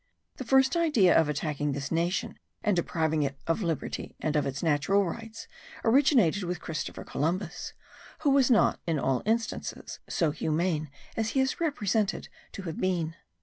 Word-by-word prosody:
The - - -4
first 265 +3 +4
idea 295 - +4
of 160 -2 +4
attacking 150 -1 -1
this 140 0 -4
nation 175 +6 -1 0.2
and 210 -3 +2
depriving 160 -2 0
it 140 -1 -1
of 165 +6 0
liberty 165 -6 -3
and 155 -1 -1
of 150 -2 +2
its 135 +3 -4
natural 165 +6 +2
rights 225 +5 -7 0.4
originated 230 - +4
with 175 -1 -3
Christopher 160 -2 -5
Columbus, 175 +4 -2 0.5
who 295 -3 +3
was 275 -2 +4
not 230 -4 +4
in 165 -2 +1
all 135 -1 +1
instances 225 +1 -2
so 165 -6 +1
humane 155 0 -1 0.3
as 225 0 0
he 270 - 0
is 265 +5 0
represented 215 - 0 0.2
to 195 - -7
have 165 -3 -5
been. 175 -4 0
175 Hz, 160 wpm, -28 LUFS, 155-225 Hz, 0.5 s, first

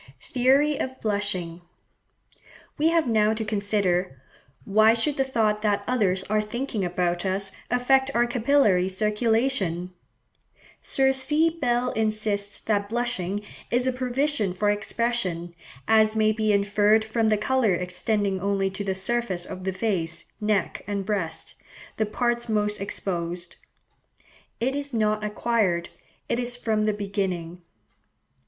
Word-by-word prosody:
Theory 275 +3 +2
of 260 0 -4
Blushing.—We 200 - -5
have 330 -4 +2
now 220 -1 +3
to 220 0 -3
consider, 200 -7 0 0.5
why 215 +2 +5
should 280 +5 0
the 270 - +2
thought 220 -5 0
that 205 -1 +1
others 195 -7 +1
are 215 +2 +1
thinking 220 0 -3
about 175 -1 -1
us 195 +1 -1 0.2
affect 265 +2 +3
our 240 0 +4
capillary 235 -7 +2
circulation? 210 -3 0 0.9
Sir 265 0 +2
C. 295 +5 +3
Bell 250 -6 0
insists 215 -2 0
that 205 -2 0
blushing 210 -4 -2 0.3
"is 245 +1 +1
a 260 - +2
provision 255 -5 0
for 205 +2 +2
expression, 205 -5 -2 0.3
as 220 0 +4
may 215 0 +3
be 215 -1 +1
inferred 205 +2 +3
from 220 0 +1
the 215 - +3
colour 220 -2 +2
extending 190 +2 -1
only 195 0 0
to 195 +2 -4
the 190 -1 -2
surface 190 -3 -1
of 185 0 -8
the 190 - 0
face, 175 -4 -2 0.2
neck, 210 -3 0
and 200 -1 -2
breast, 185 -6 -3 0.4
the 220 - 0
parts 240 +2 -1
most 210 -1 0
exposed. 175 -3 -4 1.0
It 260 +4 0
is 285 -3 -4
not 215 -1 +1
acquired; 210 -5 0 0.4
it 235 - 0
is 245 0 0
from 215 -3 0
the 215 - +2
beginning." 190 -4 -3
215 Hz, 135 wpm, -25 LUFS, 195-240 Hz, 1.0 s, why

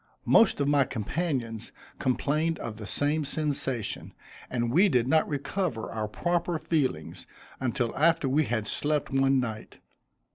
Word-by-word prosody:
Most 225 - +5
of 140 - +1
my 145 -1 +4
companions 115 - -3 0.3
complained 155 +5 0
of 110 -2 -6
the 110 -2 -7
same 150 +2 +1
sensation, 140 -6 -2 0.3
and 120 -2 -1
we 185 +9 +5
did 125 -6 +2
not 160 +3 +3
recover 145 - -2
our 110 -1 -2
proper 175 +8 -1
feelings 130 - -2 0.3
until 125 -2 -1
after 165 0 +3
we 145 +4 +2
had 115 -4 -1
slept 150 +6 -1
one 135 0 +3
night. 110 -4 -5
135 Hz, 140 wpm, -28 LUFS, 120-155 Hz, 0.3 s, Most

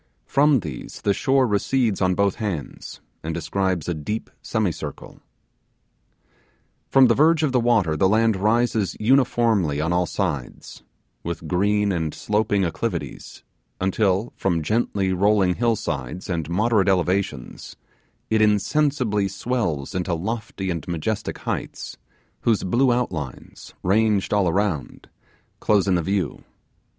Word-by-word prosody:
From 140 -3 +3
these 75 -8 -7
the 100 - +3
shore 135 +4 +2
recedes 110 0 0
on 95 -1 +2
both 100 -1 +1
hands, 95 -9 -5 0.2
and 80 0 -4
describes 90 +1 -1
a 90 - 0
deep 95 +8 -5
semicircle. 105 -7 -3 1.7
From 135 -1 +6
the 120 - +5
verge 160 +4 +4
of 150 - +2
the 125 - +2
water 110 -9 +2
the 95 +5 +3
land 110 +1 +3
rises 110 -1 +1
uniformly 115 - +2
on 80 +3 0
all 90 0 +1
sides, 75 -11 -4 0.4
with 85 -1 -5
green 100 +4 +1
and 80 -4 -2
sloping 105 -1 0
acclivities, 85 - -4 0.4
until 95 +3 0
from 85 -4 0
gently 100 -1 0
rolling 95 0 +3
hill 115 +3 +1
sides 75 - -4
and 80 -3 -2
moderate 105 +2 +2
elevations 90 -7 -1 0.6
it 110 0 +3
insensibly 110 0 +2
swells 95 - -2
into 90 -1 -1
lofty 100 0 -4
and 85 -4 -5
majestic 85 +5 -3
heights, - - -5 0.4
whose 115 -3 +1
blue 120 +7 +2
outlines, 85 - -4
ranged 105 +1 +2
all 100 -4 +3
around, 95 -4 -2 0.5
close 100 -2 +2
in 95 - +3
the 90 - +2
view. 95 -2 -2
100 Hz, 130 wpm, -23 LUFS, 85-110 Hz, 1.7 s, From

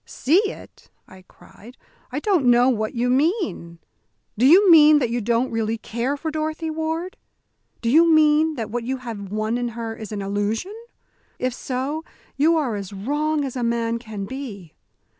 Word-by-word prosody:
"See 325 +9 +1
it?" - - -13 0.2
I 185 0 -15
cried. 240 +5 -17 0.3
"I 275 - -2
don't 345 -7 +1
know 245 +1 +5
what 220 -3 -2
you 240 +1 0
mean. 275 - 0 0.6
Do 240 +4 +3
you 370 +5 +7
mean 305 -2 +8
that 245 -5 0
you 240 0 -1
don't 235 +3 0
really 225 0 -1
care 240 +6 -3
for 315 +2 -4
Dorothy 315 +1 -3
Ward? 320 +3 -4 0.7
Do 230 - +1
you 330 +4 +5
mean 310 0 +4
that 225 -5 -5
what 240 0 -3
you 260 +3 -3
have 220 -6 -8
won 215 +3 -1
in 245 - -2
her 225 -1 -4
is 220 -2 -9
an 205 -2 -4
illusion? 205 - -2 0.6
If 255 0 -2
so, 270 +5 -4 0.3
you 320 +4 +3
are 265 -8 -1
as 200 -1 -6
wrong 295 +8 -1
as 265 - -6
a 250 - -3
man 235 0 -1
can 215 -4 -7
be." 205 - -8
250 Hz, 180 wpm, -22 LUFS, 225-310 Hz, 0.7 s, mean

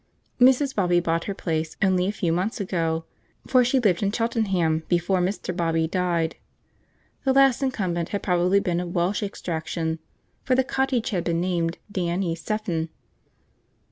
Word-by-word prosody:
Mrs. 265 +2 +5
Bobby 180 -3 +2
bought 170 -1 -1
her 200 - -3
place 160 -4 -3
only 185 -1 +2
a - - +1
few 175 -5 -1
months 195 +7 -1
ago, 165 -4 -1 0.4
for 255 -1 +4
she 255 +2 +2
lived 200 -8 +2
in 200 -1 +1
Cheltenham 195 -8 +1
before 180 +2 +1
Mr. 180 -1 -2
Bobby 165 -2 +1
died. 170 -2 0 0.9
The 265 - +2
last 270 -2 +5
incumbent 185 -11 -1
had 200 - -3
probably 180 +1 +3
been 175 -3 -1
of 175 0 -5
Welsh 175 +4 +1
extraction, 165 -4 -3 0.4
for 255 - +1
the 265 - +3
cottage 265 -3 0
had 180 -4 -1
been 170 -1 0
named 170 -2 -1
'Dan 180 -1 -1
y 170 -4 0
cefn.' 165 -1 -2
180 Hz, 160 wpm, -24 LUFS, 170-210 Hz, 0.9 s, Mrs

